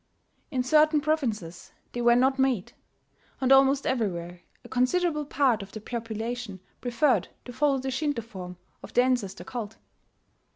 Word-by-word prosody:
In 255 -3 -1
certain 305 +3 +4
provinces 230 - -2 0.2
they 240 - -3
were 235 0 +5
not 265 +2 +3
made; 260 -8 +1 0.7
and 260 0 +1
almost 270 +1 +5
everywhere 175 -8 -2 0.2
a - - -11
considerable 300 +4 +1
part 265 -6 +2
of 195 0 -10
the 215 - -6
population 225 -1 -5 0.2
preferred 245 +2 +2 0.2
to 245 - -8
follow 285 +1 +2
the 265 0 -3
Shinto 285 -3 -1
form 185 -5 -9 0.2
of - - -11
the 245 - +5
ancestor 245 -7 -1
cult. 220 -3 -6
245 Hz, 150 wpm, -27 LUFS, 220-270 Hz, 0.7 s, were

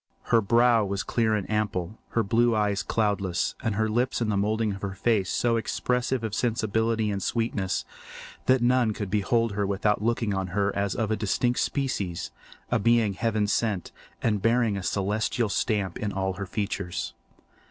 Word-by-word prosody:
Her 115 - +6
brow 115 +2 +4
was 100 -1 -2
clear 110 +3 +1
and 100 -3 -2
ample, 105 -2 -2
her 115 - +2
blue 115 +3 +3
eyes 105 -2 +1
cloudless, 100 -5 0
and 110 -3 0
her 110 +1 +1
lips 120 +4 0
and 115 -3 0
the - - 0
moulding 105 +1 +1
of 100 - -8
her 95 -1 -4
face 105 -3 +1
so 115 -1 +1
expressive 125 +2 -1
of 110 -2 -3
sensibility 110 -1 0
and 100 -1 -2
sweetness 110 -3 -1 0.6
that 130 -1 +4
none 120 -2 +3
could 100 -2 -5
behold 115 +2 +1
her 100 0 -1
without 100 +1 +1
looking 115 -1 0
on 95 -1 -1
her 100 -1 +1
as 100 -2 -1
of 110 -2 -1
a - - +3
distinct 110 +4 0
species, 105 - -2 0.4
a 120 - +3
being 115 -1 +3
heaven 110 0 0
sent, 105 -2 -1 0.3
and 105 -3 +1
bearing 115 -1 +2
a 100 - -3
celestial 105 +4 0
stamp 100 -3 -1
in 105 -1 -2
all 95 -1 -1
her 100 0 -6
features. 90 -3 -3
105 Hz, 175 wpm, -26 LUFS, 100-115 Hz, 0.6 s, Her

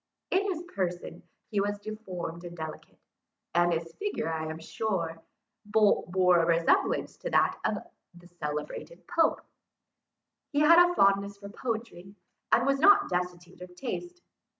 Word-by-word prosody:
In 380 +2 +3
his 345 -2 -4
person 180 - -4 0.3
he 205 -2 +1
was 205 +1 -1
deformed 190 -6 -6
and 175 0 -9
delicate; 160 -1 -8 0.6
and 175 0 +3
his 165 0 -3
figure, 400 - -2
I 160 0 -3
am 160 0 -5
told, 170 0 -2 0.5
bore 190 -4 +3
a - - +1
resemblance 165 0 +2
to - - -5
that - - +2
of - - 0 0.4
the 175 0 -15
celebrated 150 - -6
Pope. 335 -2 +2 1.1
He 290 -1 +1
had 335 +3 +8
a 355 - -3
fondness 200 0 +3
for 200 0 -10
poetry, 220 -4 -5 0.4
and - - +4
was 275 0 +2
not 400 +7 +6
destitute 180 0 -4
of 180 0 -10
taste. 350 - -6
190 Hz, 145 wpm, -29 LUFS, 175-230 Hz, 1.1 s, had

